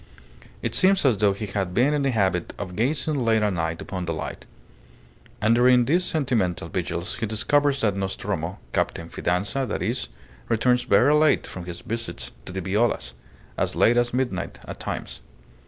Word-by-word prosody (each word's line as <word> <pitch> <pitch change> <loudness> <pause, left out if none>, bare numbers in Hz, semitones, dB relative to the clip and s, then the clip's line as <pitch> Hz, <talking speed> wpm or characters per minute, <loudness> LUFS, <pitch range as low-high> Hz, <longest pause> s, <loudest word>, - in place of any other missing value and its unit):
It - - -1
seems 190 -3 +4
as 125 -6 +4
though 100 0 +3
he 105 +2 -5
had 95 -3 -3
been 135 +5 +3
in 145 - +1
the 140 - +1
habit 95 -7 0
of 90 -3 -6
gazing 140 - 0
late 110 -2 +3
at 105 -2 +1
night 80 -1 -2
upon 95 -2 -4
the 85 - -2
light. - - -6 0.9
And 110 +2 +3
during 125 0 +5
these 170 +8 +2
sentimental 115 - 0
vigils 85 +1 -3
he 115 - -2
discovers 140 +6 +1
that 105 -3 +2
Nostromo, 95 -1 -3 0.2
Captain 85 0 -1
Fidanza 100 +10 -1
that 105 - -2
is, - - -1 0.4
returns 125 +2 +2
very 145 +3 +5
late 150 0 +4
from 90 -2 -8
his 90 -1 -6
visits 115 +1 -5 0.2
to - - -5
the 95 +1 -4
Violas. 100 - 0 0.5
As - - 0
late 120 - +4
as 120 0 +2
midnight 120 -7 -2
at - - -8
times." - - -5
110 Hz, 175 wpm, -24 LUFS, 95-130 Hz, 0.9 s, during